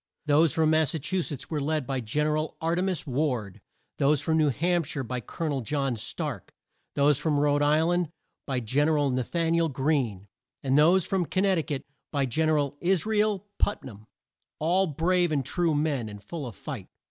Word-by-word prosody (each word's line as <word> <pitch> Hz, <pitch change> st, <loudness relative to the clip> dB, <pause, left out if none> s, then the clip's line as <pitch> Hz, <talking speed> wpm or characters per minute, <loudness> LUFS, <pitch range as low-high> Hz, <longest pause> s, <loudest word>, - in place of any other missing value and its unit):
Those 150 Hz, +1 st, +4 dB
from 160 Hz, +2 st, +2 dB
Mas 155 Hz, -2 st, +3 dB
sa -, -, -1 dB
chu 185 Hz, +5 st, -1 dB
setts 145 Hz, -3 st, -5 dB
were 155 Hz, -, 0 dB
led 155 Hz, -1 st, -1 dB
by 135 Hz, -1 st, -2 dB
Gen 125 Hz, +6 st, -1 dB
er 150 Hz, 0 st, +1 dB
al 155 Hz, +1 st, -3 dB
Ar 165 Hz, +1 st, 0 dB
te 175 Hz, -, +1 dB
mas 185 Hz, -4 st, -1 dB
Ward; 125 Hz, -8 st, -2 dB, 0.4 s
those 145 Hz, 0 st, +3 dB
from 160 Hz, +3 st, 0 dB
New 155 Hz, -2 st, +3 dB
Hamp 170 Hz, +5 st, +1 dB
shire 140 Hz, -2 st, -3 dB
by 125 Hz, +1 st, -3 dB
Col 165 Hz, -, -5 dB
o -, -, 0 dB
nel 140 Hz, -3 st, -1 dB
John 135 Hz, +1 st, -1 dB
Stark; 110 Hz, -, -5 dB, 0.4 s
those 145 Hz, -1 st, +3 dB
from 150 Hz, -1 st, +1 dB
Rhode 145 Hz, 0 st, +2 dB
Isl 155 Hz, +4 st, +3 dB
and 175 Hz, -3 st, 0 dB, 0.4 s
by 130 Hz, -3 st, 0 dB
Gen 140 Hz, +7 st, +1 dB
er 155 Hz, -, +2 dB
al 145 Hz, -2 st, +2 dB
Na 130 Hz, 0 st, 0 dB
than 165 Hz, +6 st, 0 dB
i -, -, +3 dB
el 165 Hz, -1 st, +2 dB
Greene; 130 Hz, -8 st, -1 dB, 0.4 s
and 135 Hz, -1 st, +1 dB
those 165 Hz, +5 st, +5 dB
from 185 Hz, -4 st, 0 dB
Con 185 Hz, -, 0 dB
nect 190 Hz, -3 st, +3 dB
i -, -, +2 dB
cut 145 Hz, -3 st, -4 dB, 0.3 s
by 140 Hz, -2 st, +1 dB
Gen 155 Hz, +6 st, 0 dB
er 155 Hz, -, +3 dB
al 145 Hz, -1 st, -1 dB
Is 185 Hz, 0 st, +2 dB
ra 220 Hz, 0 st, -1 dB
el 210 Hz, -2 st, +1 dB
Put 205 Hz, -, 0 dB
nam; 110 Hz, -4 st, -11 dB, 0.5 s
all 180 Hz, +5 st, +2 dB
brave 175 Hz, +3 st, +1 dB
and 140 Hz, -4 st, 0 dB
true 170 Hz, 0 st, 0 dB
men, 145 Hz, -7 st, 0 dB
and 105 Hz, -1 st, -10 dB
full 145 Hz, +5 st, -6 dB
of 115 Hz, -, -9 dB
fight. -, -, -7 dB
150 Hz, 230 wpm, -27 LUFS, 135-165 Hz, 0.5 s, those